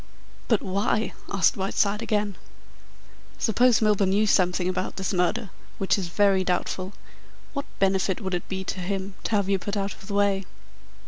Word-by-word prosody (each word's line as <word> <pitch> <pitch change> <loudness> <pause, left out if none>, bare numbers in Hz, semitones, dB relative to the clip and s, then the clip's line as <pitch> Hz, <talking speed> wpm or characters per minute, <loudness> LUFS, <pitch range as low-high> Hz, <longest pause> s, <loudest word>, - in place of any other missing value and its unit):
"But 225 -4 +2
why?" 200 +3 0 0.2
asked 195 - +3
Whiteside 200 +2 0
again. 210 -3 0 1.0
"Suppose 235 0 +3
Milburgh 210 -2 +3
knew 200 +3 +3
something 180 -2 +2
about 185 - -2
this 190 +1 -2
murder 195 +4 0 0.3
which 195 - +2
is 190 -3 -3
very 195 +1 +3
doubtful 185 +1 -2 0.6
what 280 -1 -3
benefit 190 -1 +1
would 190 -4 -4
it 175 - -3
be 190 0 -3
to 190 - -4
him 190 +1 -3
to - - -1
have 200 -2 +1
you 195 -1 +2
put 205 +3 -3
out 195 0 -1
of 195 - -15
the 200 - -3
way?" 200 -1 +2
195 Hz, 170 wpm, -26 LUFS, 190-205 Hz, 1.0 s, asked